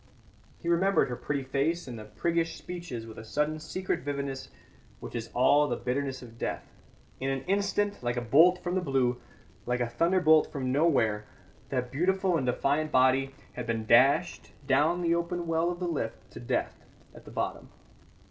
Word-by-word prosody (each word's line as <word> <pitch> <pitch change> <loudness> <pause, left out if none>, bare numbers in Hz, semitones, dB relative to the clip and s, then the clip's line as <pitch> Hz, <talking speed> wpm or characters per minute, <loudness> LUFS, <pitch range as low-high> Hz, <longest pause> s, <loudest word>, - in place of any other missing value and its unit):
He - - -9
remembered 180 -1 +3
her 125 - -3
pretty 140 +2 -3
face 140 +6 -1
and 120 -3 -7 0.2
priggish 165 +6 0
speeches 170 -10 -7
with 110 -1 -10
a - - -8
sudden 150 +7 -1
secret 185 +2 -3
vividness 140 -3 -4 0.5
which - - -9
is 115 -1 -4
all 145 +4 +5
the - - -1
bitterness 130 +1 -3
of 115 -1 -13
death. - - -3 0.6
In 135 - -1
an 135 -1 -2
instant 200 +1 0
like 120 0 -2
a - - 0
bolt 160 +10 +5
from 175 - -2
the 185 - +1
blue, 130 -6 0 0.5
like 125 0 0
a 120 - 0
thunderbolt 160 +4 +3
from 130 -3 -2
nowhere, 120 -9 +2 0.4
that 125 -2 -2
beautiful 185 +4 +1
and 135 -6 0
defiant 145 +5 +1
body 130 +1 +3 0.2
had 125 -1 -6
been 115 -1 -1
dashed 125 +5 +3
down 150 +6 +2
the 170 0 +3
open 170 +1 -2
well 165 +1 +1
of 175 0 -4
the 180 - -2
lift 145 -9 -4
to - - -9
death - - -2 0.3
at - - -14
the - - -11
bottom. - - -4
140 Hz, 175 wpm, -29 LUFS, 125-170 Hz, 0.6 s, all